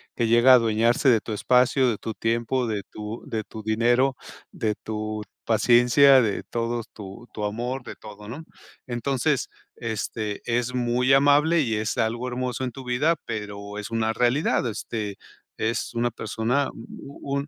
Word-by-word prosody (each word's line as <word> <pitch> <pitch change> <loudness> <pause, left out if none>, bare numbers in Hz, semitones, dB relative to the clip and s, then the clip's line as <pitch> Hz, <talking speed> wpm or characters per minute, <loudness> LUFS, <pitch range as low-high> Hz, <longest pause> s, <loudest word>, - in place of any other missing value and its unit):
Que 115 - 0
llega 120 +3 +6
a - - +10
adueñarse 115 +3 +2
de 115 -3 +5
tu 110 - -6
espacio, 125 +4 +3
de 110 - -1
tu 110 - -5
tiempo, 115 +3 -1
de 105 -3 -2
tu 105 +2 -7
de 110 -1 -3
tu 110 +1 -10
dinero, 120 +5 +2 0.4
de 110 -1 -2
tu 110 0 -5 0.2
paciencia, 120 +4 +5
de 105 -4 -1
todos 115 0 -3
tu 105 +3 -10
tu 105 - -5
amor, 120 +5 -3
de - - -8
todo, 105 -1 -12
¿no? 140 +8 -7 0.4
Entonces, 135 +3 -1 0.3
este, 110 -2 -4
es 120 +1 -1
muy 125 +1 +1
amable 145 +4 +4
y 115 -6 -1
es 105 0 -2
algo 115 +3 -1
hermoso 125 0 -3
en 125 - -3
tu 135 +2 -10
vida, 130 +7 +1
pero 105 -1 -6
es 105 - -6
una 115 -1 0
realidad, 125 +3 +1
este, 105 -1 -4 0.4
es 115 +1 -2
una 120 +1 0
persona, 115 +6 -1
un 140 +4 -6
120 Hz, 160 wpm, -25 LUFS, 110-125 Hz, 0.4 s, a